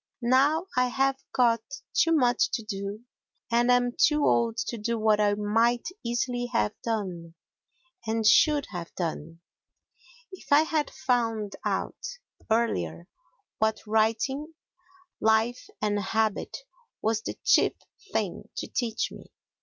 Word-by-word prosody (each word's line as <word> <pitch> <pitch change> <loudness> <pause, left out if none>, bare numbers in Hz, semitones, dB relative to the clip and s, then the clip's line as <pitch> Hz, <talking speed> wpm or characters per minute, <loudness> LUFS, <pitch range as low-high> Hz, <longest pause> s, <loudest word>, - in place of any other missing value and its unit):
Now 280 +7 +3
I 250 0 +3
have 270 +1 +1
got 235 -2 +3 0.3
too 330 - +3
much 300 +6 +3
to 230 - -1
do 200 0 -5 0.5
and 240 +1 +3
am 245 0 +4
too 300 -1 +3
old 230 -1 +2
to 235 - -4
do 230 +2 -1
what 215 -1 +3
I 205 -1 +3
might 225 +5 +1
easily 245 +1 -1
have 225 -2 +1
done, 180 -7 -4 0.7
and 225 0 0
should 295 +4 +5
have 175 -3 -7
done, 165 -1 -4 0.9
if 375 - -13
I 290 +2 +7
had 315 -2 -1
found 225 -5 -1
out - - -2 0.5
earlier 175 - 0 0.5
what 220 0 +1
writing 225 +8 0 0.6
Life 220 +3 +2 0.2
and 205 -1 +1
Habit 220 +1 -1 0.5
was 220 0 +1
the - - -5
chief - - +4 0.4
thing - - -2
to - - -3
teach 230 -3 -2
me. - - -13
230 Hz, 130 wpm, -27 LUFS, 210-250 Hz, 0.9 s, I